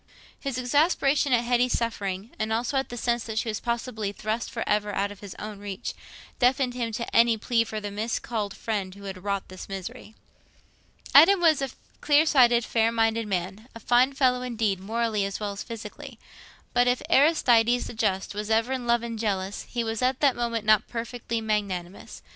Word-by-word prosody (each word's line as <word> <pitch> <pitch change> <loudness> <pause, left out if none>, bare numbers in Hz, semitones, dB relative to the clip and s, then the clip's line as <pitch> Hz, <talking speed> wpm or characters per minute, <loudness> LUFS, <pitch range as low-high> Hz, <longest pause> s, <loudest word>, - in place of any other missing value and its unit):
His 275 -3 -4
exasperation 280 +2 +2
at 240 -1 +3
Hetty's 245 +1 +2
suffering—and 215 -1 -3
also 235 +5 -1
at 270 0 0
the 245 - -7
sense 235 0 0
that 220 -1 -5
she 225 - 0
was 215 - -2
possibly 235 -3 -3
thrust 215 +3 -3
for 230 - -4
ever 210 0 +1
out 200 +1 0
of 205 - -11
his 200 -3 -9
own 210 -1 -7
reach—deafened 245 +5 -2
him 235 -2 -3
to 235 +2 -4
any 230 -1 +5
plea 230 +1 +1
for 220 -1 -5
the 205 -1 -5
miscalled 215 -1 -3
friend 200 -4 -3
who 200 - -13
had 190 -2 -7
wrought 200 -1 -2
this 185 +1 -10
misery. 215 +4 -7 1.0
Adam 335 +8 +8
was 320 -5 +4
a 270 - -1 0.3
clear 295 +1 +4
sighted, 245 -6 +4
fair 225 0 +2
minded 225 -1 +1
man—a 200 +5 -4
fine 245 +3 +3
fellow, 260 -2 +2
indeed, 220 -6 -1
morally 220 +1 -1
as 195 0 -3
well 210 -1 -3
as 200 - -7
physically. 230 +3 -8 0.6
But 245 0 +3
if 245 0 +1
Aristides 245 -5 +4
the - - -7
Just 200 -4 -1
was 210 +1 -5
ever 225 +4 +2
in 250 -2 -4
love 235 0 +2
and 230 -1 -5
jealous, 200 -2 -2
he 240 -1 -2
was 225 0 -3
at 255 +1 +1
that 280 -4 +3
moment 230 -2 -2
not 215 -1 +4
perfectly 235 -1 -4
magnanimous. 200 -4 -3
230 Hz, 185 wpm, -26 LUFS, 210-245 Hz, 1.0 s, Adam